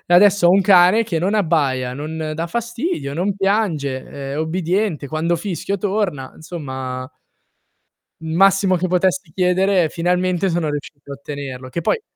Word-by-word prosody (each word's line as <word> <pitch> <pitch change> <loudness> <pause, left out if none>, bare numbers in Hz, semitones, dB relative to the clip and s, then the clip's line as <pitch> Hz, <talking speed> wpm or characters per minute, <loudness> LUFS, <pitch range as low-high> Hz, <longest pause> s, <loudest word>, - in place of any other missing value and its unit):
E 175 - +6
adesso 200 -1 +6
ho - - +6
un 195 +2 +4
cane 190 +3 +5
che 175 -7 -2
non 190 +6 0
abbaia, 140 -10 +1
non 155 +3 -5
dà 165 +2 -3
fastidio, 235 - -3
non 190 +5 -1
piange, 185 -10 0 0.3
è 145 - -3
ubbidiente, 170 0 -1
quando 160 +3 -1
fischio 195 +2 -3
torna, 190 -9 -2
insomma 130 -6 -6 1.1
il 160 0 -5
massimo 195 0 +4
che 180 +1 -1
potessi 185 -1 +1
chiedere 185 0 +2
finalmente 180 +2 0
sono 170 -2 -1
riuscito 145 -1 -6
a - - -4
ottenerlo. 140 -2 -7
Che 170 - -4
poi 170 - 0
175 Hz, 155 wpm, -20 LUFS, 150-195 Hz, 1.1 s, E